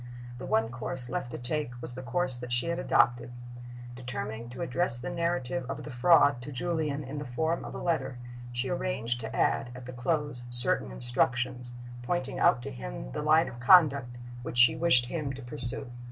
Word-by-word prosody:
The - - -7
one 110 +1 +1
course 120 +1 +1
left 120 - -3
to - - -6
take 120 0 -3
was 120 - -5
the 130 - -7
course 130 +2 -1
that 120 0 -8
she 125 +5 0
had 170 +1 -2
adopted. 120 -7 +2 0.6
Determining 120 -2 -6
to 120 - -6
address 130 -2 0
the 125 +8 -6
narrative 170 -7 -2
of 140 +2 -5
the 150 - -8
Fraud 140 0 +4
to 140 +4 -7
Julian 150 +1 -2
in 140 +2 -6
the - - -5
form 160 +6 -2
of - - -8
a - - -4
letter, 135 -7 -2 0.3
she 125 +2 -2
arranged 115 - -2
to 110 - -6
add, 135 - +1
at 125 0 -10
the 125 - -8
close, 145 0 -2
certain 120 - +5
instructions, 120 - -1 0.3
pointing 135 0 -2
out 120 - +3
to - - -6
him - - -7
the - - -4
line 155 +2 +4
of 120 - -9
conduct 135 -4 +4 0.2
which 120 - -6
she 125 +6 +9
wished 155 -7 +4
him 145 0 -4
to 135 - -9
pursue. 120 +1 -3
125 Hz, 195 wpm, -28 LUFS, 120-150 Hz, 0.6 s, she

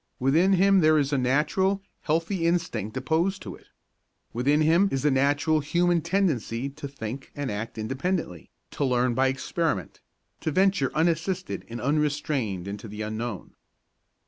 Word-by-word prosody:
Within 160 +9 +3
him 195 +1 +5
there 155 -2 +5
is 145 -1 +1
a - - +3
natural, 190 +10 +1 0.2
healthy 165 +3 0
instinct 145 - -1
opposed 175 +5 0
to - - -7
it. - - -16 0.7
Within 140 +6 +2
him 170 +6 +4
is 135 - -1
the 150 - +3
natural 145 +3 +2
human 170 +3 +1
tendency 150 - 0
to 140 +1 -8
think 135 -1 -7
and 145 -3 -3
act 110 +3 -5
independently, 130 - -3 0.2
to - - -2
learn 125 -2 +2
by 135 +2 +2
experiment, 135 - -2 0.4
to 160 - -2
venture 185 -4 +2
unassisted 170 +3 -1
and 120 +1 -6
unrestrained 140 - -1
into 105 +2 -6
the 105 +1 -6
unknown. 110 -1 -5
145 Hz, 145 wpm, -26 LUFS, 125-170 Hz, 0.7 s, him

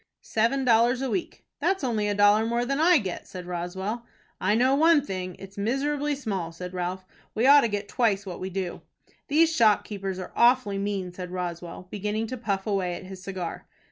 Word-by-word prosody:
"Seven 245 +5 +1
dollars 240 +2 +4
a 265 - -2
week." 365 - -4
"That's 385 -5 0
only 220 -5 0
a 205 - 0
dollar 205 +1 +5
more 235 +1 0
than 275 +3 -1
I 340 +2 +6
get," 190 -9 -4
said 180 -2 -8
Roswell. 190 +6 -4 0.4
"I 205 +3 +2
know 255 +3 +3
one 305 0 +4
thing, 185 -4 -4
it's 195 +1 -10
miserably 285 +6 0
small," 195 -11 -3
said 180 +2 -8
Ralph. 185 +1 -3 0.3
"We 225 - +2
ought 285 +1 +8
to 235 - +2
get 205 -1 -3
twice 210 -5 +1
what 180 -3 -6
we 185 - -4
do." 185 -1 -4 0.5
"These 320 +2 +3
shop 215 -3 +4
keepers 195 -3 -5
are 185 - -7
awfully 235 -5 +3
mean," 195 -2 -2
said 180 0 -7
Roswell, 175 -1 -5
beginning 210 +2 -2
to 255 - -4
puff 200 -4 -2
away 190 -4 -1
at - - -8
his 185 0 -9
cigar. 185 -3 -6
205 Hz, 200 wpm, -26 LUFS, 185-250 Hz, 0.5 s, ought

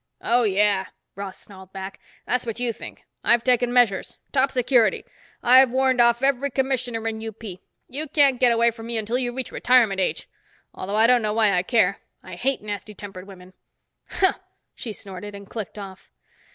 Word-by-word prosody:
"Oh, 240 +1 +2
yeah." 200 -2 +2 0.3
Ross 195 -1 -7
snarled 190 -2 -14
back. 190 0 -7 0.3
"That's 250 - 0
what 230 -1 -5
you 245 -2 -1
think. - - -12 0.2
I've 235 -1 +3
taken 245 -1 +2
measures. 240 -6 +2
Top 270 0 +2
security. 250 -3 +2 0.4
I've 255 +1 +7
warned 260 -1 +2
off 235 +1 +3
every 275 0 +1
Commissioner 255 -4 -2
in 220 0 -4
UP. 225 0 -8 0.4
You 300 +5 -5
can't 280 -3 +3
get 250 -2 +5
away 235 0 +3
from 225 0 -10
me 235 -1 -3
until 225 +3 -1
you 245 -2 -1
reach 255 0 -6
retirement 230 -6 +3
age. 185 - -2 0.5
Although 200 +2 -5
I 220 - +5
don't 245 0 +4
know 210 -1 -1
why 215 -2 +3
I 180 - +2
care. 200 -1 +1 0.2
I 185 - -11
hate 255 +7 -1
nasty 210 0 -6
tempered 195 -1 -10
women." 185 -1 -14 0.6
"Huh!" 380 - +1 0.3
she 230 - -7
snorted 200 0 -8
and 200 0 -11
clicked 215 -1 -7
off. 195 -2 -10
230 Hz, 180 wpm, -23 LUFS, 200-250 Hz, 0.6 s, I've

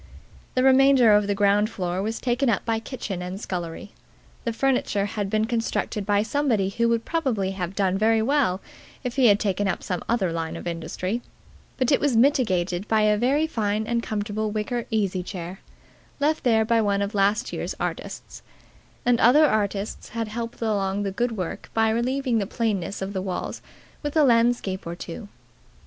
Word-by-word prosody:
The 255 - +2
remainder 265 -3 +6
of 205 -1 +4
the 205 - 0
ground 205 +1 +3
floor 180 -3 -3
was 220 +3 -3
taken 245 +1 +1
up 225 - 0
by 225 -1 0
kitchen 220 -6 -5
and 180 +2 -5
scullery. 175 0 -5 0.5
The 235 - 0
furniture 230 -5 +1
had 205 -1 -3
been 215 +1 +1
constructed 225 -3 -2
by 205 0 +3
somebody 225 -6 +1
who 235 +4 +1
would 230 -1 0
probably 250 - 0
have 190 -1 -4
done 195 -1 +1
very 220 +1 +3
well 255 -8 +1 0.4
if 250 -2 -3
he 265 -3 +5
had 205 -1 +5
taken 205 -1 0
up 190 - -2
some 180 -2 -3
other 210 -7 +1
line 165 -1 -3
of - - -8
industry; 175 +6 -3 0.6
but 255 0 +1
it 275 - +4
was 280 -5 +1
mitigated 195 -8 +2
by 220 -1 +3
a 210 0 +4
very 265 +8 +2
fine 215 -7 -1
and 235 +1 0
comfortable 215 0 -2
wicker 220 +3 -2
easy 200 -4 0
chair, 180 0 -7 0.6
left 305 +2 +1
there 225 -3 +3
by 230 0 +3
one 200 -1 +1
of 200 - -4
last 205 +4 +1
year's - - -3
artists; - - -5 0.6
and 245 -1 +3
other 280 +7 +6
artists 205 -5 -1
had 225 -1 -3
helped 230 +1 -5
along 200 -2 0
the 195 - -2
good 240 +4 -1
work 180 -3 -5
by 225 0 +3
relieving 250 +1 0
the 200 - -2
plainness 200 -4 -2
of 195 +1 -5
the 190 - -2
walls 185 -1 -4 0.4
with 295 +1 -3
a 310 - +6
landscape 230 -7 +2
or 170 - -4
two. 185 +5 -8
215 Hz, 185 wpm, -24 LUFS, 195-240 Hz, 0.6 s, remainder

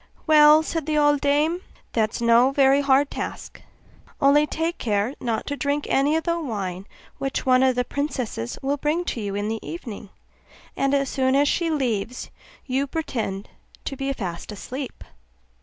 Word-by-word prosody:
'Well,' 305 0 +7
said 320 -1 -3
the 305 -1 +1
old 290 -1 +3
dame, 300 +5 +1 0.3
'that 220 -2 0
is - - -4
no 235 +2 +5
very 275 0 +4
hard 280 0 +3
task: - - -6 0.6
only 295 +1 +4
take 325 +3 -2
care 210 +2 0
not 230 -2 -2
to 285 - -3
drink 285 0 -1
any 285 +3 +2
of 320 - 0
the 340 -1 0
wine 195 - -4 0.3
which 270 0 -2
one 255 -1 +4
of 260 -1 +3
the 250 - +1
princesses 255 - -3
will 280 +2 0
bring 310 +5 -1
to 235 - -3
you 200 -1 -3
in 205 +1 -2
the 220 0 -2
evening; 235 - -8 0.7
and 275 +1 +1
as 275 -1 +1
soon 260 0 +1
as 285 +1 +4
she 335 +2 +1
leaves 250 -6 -2 0.3
you 270 +1 -1
pretend 225 -10 -4 0.3
to 275 - -4
be 270 +1 -2
fast 185 -7 -5
asleep. 255 +6 -7
275 Hz, 175 wpm, -24 LUFS, 235-295 Hz, 0.7 s, Well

